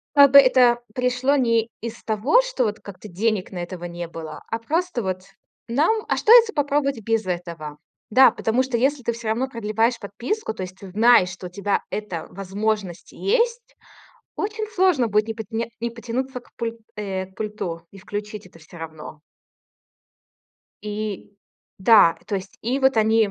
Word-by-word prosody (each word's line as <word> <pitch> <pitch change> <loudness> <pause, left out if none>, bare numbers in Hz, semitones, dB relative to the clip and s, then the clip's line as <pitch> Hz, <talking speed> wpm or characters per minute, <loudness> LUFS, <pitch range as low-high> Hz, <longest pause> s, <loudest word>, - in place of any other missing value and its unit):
Как 280 -1 +8
бы 280 - +9
это 255 -3 +6 0.2
пришло 250 +2 +1
не 230 -4 +2
из 230 0 -7
того, 225 - +3
что - - -1
вот 215 -1 -2
как-то 200 +1 -11
денег 205 +1 -1
на 185 - -7
это 175 +2 -5
не 175 0 -6
было, 160 -2 -8
а 225 - -3
просто 325 +2 -1
вот 185 -1 -3 0.4
нам: 315 - +1
"А - - +1
что, - - 0
если 470 -2 +8
попробовать 285 - 0
без 225 0 0
этого?" 170 -4 -5 0.3
Да, 260 +4 +7
потому 230 +3 0
что 260 -2 -2
если 270 +3 +1
ты 235 - -1
всё 230 -1 -6
равно 240 +5 0
продлеваешь 230 0 0
подписку, 230 - -4
то 190 - -6
есть 185 0 -7
ты 195 0 -11
знаешь, 215 -2 +5
что 180 0 -8
у - - -18
тебя 200 +2 -1
эта 205 -6 -4
возможность 195 -1 -3
есть, 470 +2 -1 0.6
очень 430 +1 -3
сложно 360 - +3
будет 210 +1 +2
не 225 - -3
пот 220 -1 -7
не 230 0 -2
не 235 0 -2
потянуться 245 +2 -4
к - - -24
пуль 230 0 -4 0.2
э, 190 -3 -3
к 190 - -24
пульту 185 -6 -5
и 195 - -14
включить 210 +1 -6
это 180 - -17
все 165 +2 -14
равно. 155 -1 -9 1.6
И 210 -1 -5 0.4
да, 190 -5 +6
то 205 - -3
есть 190 0 -9
и 250 +4 0
вот 265 -2 +3
они 220 -1 +3
225 Hz, 180 wpm, -23 LUFS, 195-255 Hz, 1.6 s, бы